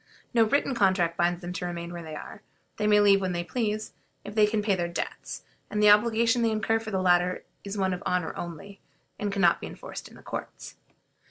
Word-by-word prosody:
No 230 -2 +5
written 275 +4 +1
contract 190 -6 +2
binds 175 +1 +1
them 175 0 -5
to 180 - -4
remain 170 0 -5
where 175 - -6
they 160 -2 -7
are; 195 - -9 0.4
they 210 - 0
may 210 0 +6
leave 200 -1 +5
when 185 -1 -1
they 175 0 -2
please, 215 +2 -2 0.3
if 205 - -8
they 210 -1 +5
can 210 0 0
pay 205 -1 +2
their 175 -2 0
debts; 170 - -5 0.3
and 210 - -2
the 210 0 +7
obligation 230 +2 +4
they 230 - +3
incur 220 +1 +1
for 225 -1 -7
the 190 -3 -1
latter 180 0 +2 0.2
is 200 +1 -5
one 190 -1 +1
of 180 - -5
honor 180 -2 -1
only, 175 +4 -7 0.4
and 205 -1 -1
can 200 -1 -1
not 170 - +4
be - - -5
enforced - - -8
in - - -16
the - - -15
courts. - - -7
200 Hz, 230 wpm, -27 LUFS, 175-215 Hz, 0.4 s, the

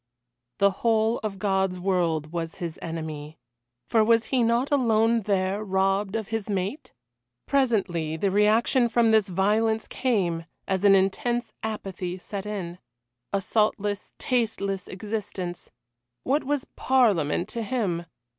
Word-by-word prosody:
The 200 0 +4
whole 225 0 +2
of 210 -3 -4
God's 190 -2 0
world 170 -5 0
was 165 -1 -3
his 170 -2 -6
enemy 155 -2 -6 0.5
for 225 -2 +4
was 230 0 +4
he 255 - +4
not 235 +4 +2
alone 230 -4 +3
there, 195 0 0
robbed 195 +1 +1
of 220 -2 -3
his 225 -2 -3
mate? 200 +9 -3 0.5
Presently 195 - +1
the 195 +3 0
reaction 220 +5 +3
from 230 0 +3
this 215 -3 +3
violence 215 +4 +1
came, 185 -10 0 0.2
and 190 0 -1
an 200 -1 +7
intense 235 +5 0
apathy 190 -4 -4
set 195 +2 -6
in. 180 -4 -5 0.5
A 200 - 0
saltless, 205 0 0
tasteless 215 -6 -1
existence. 195 -3 -5 0.5
What 285 +4 +1
was 285 -1 -1
Parliament 205 - +2
to 230 - -4
him? 200 -7 -2
205 Hz, 130 wpm, -26 LUFS, 185-225 Hz, 0.5 s, an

